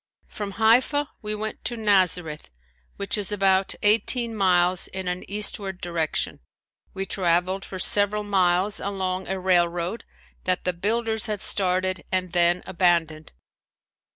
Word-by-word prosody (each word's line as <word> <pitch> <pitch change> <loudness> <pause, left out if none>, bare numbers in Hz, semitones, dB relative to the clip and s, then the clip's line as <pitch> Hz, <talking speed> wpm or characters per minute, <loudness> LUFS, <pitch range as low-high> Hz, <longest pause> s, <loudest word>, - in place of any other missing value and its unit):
From 205 -2 -7
Haifa 250 +7 +2
we 215 0 -3
went 215 +1 -6
to 240 - -1
Nazareth 180 - +1 0.5
which 200 +2 -2
is 205 0 -1
about 195 -1 +1
eighteen 230 +3 +3
miles 180 -2 +2
in 190 -1 -6
an 180 0 -3
eastward 200 -2 -1
direction. 170 -3 -2 0.6
We 195 0 -3
traveled 185 +1 0
for 190 - -8
several 205 +2 +4
miles 190 0 +1
along 190 -2 -3
a 190 0 -3
railroad 175 +2 0 0.4
that 185 0 0
the 180 - 0
builders 220 +4 -1
had 210 -2 -3
started 185 -2 0
and 185 -1 -1
then 175 0 +2
abandoned. 170 -4 0
190 Hz, 130 wpm, -24 LUFS, 180-210 Hz, 0.6 s, several